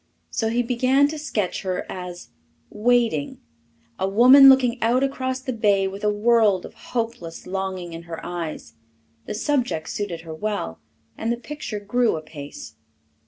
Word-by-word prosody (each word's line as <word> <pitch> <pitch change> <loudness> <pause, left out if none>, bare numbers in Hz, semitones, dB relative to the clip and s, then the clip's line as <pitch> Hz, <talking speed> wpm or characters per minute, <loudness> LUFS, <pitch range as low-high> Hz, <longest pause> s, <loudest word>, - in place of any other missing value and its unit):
So 225 - 0
he 240 +2 +1
began 255 +4 +3
to 310 0 -5
sketch 210 -11 -2
her 185 -1 -3
as 180 -1 -7 0.4
"Waiting" 225 -9 +1 0.6
a 190 - 0
woman 255 +7 +8
looking 255 -2 +4
out 240 +4 +2
across 260 -1 -2
the 260 0 -3
bay 205 -4 +2
with 195 +2 -7
a 210 - +3
world 210 -3 +3
of - - -11
hopeless 230 -8 -5
longing 185 -2 -4
in 165 - -7
her 165 - -5
eyes. 170 -3 -5 0.5
The - - -4
subject 245 - -1
suited 185 -5 -4
her 165 -1 -8
well, 160 - -3 0.4
and 225 - -1
the 235 - -1
picture 270 -4 -6
grew 230 +2 +1
apace. 155 - -9
215 Hz, 155 wpm, -23 LUFS, 180-245 Hz, 0.6 s, woman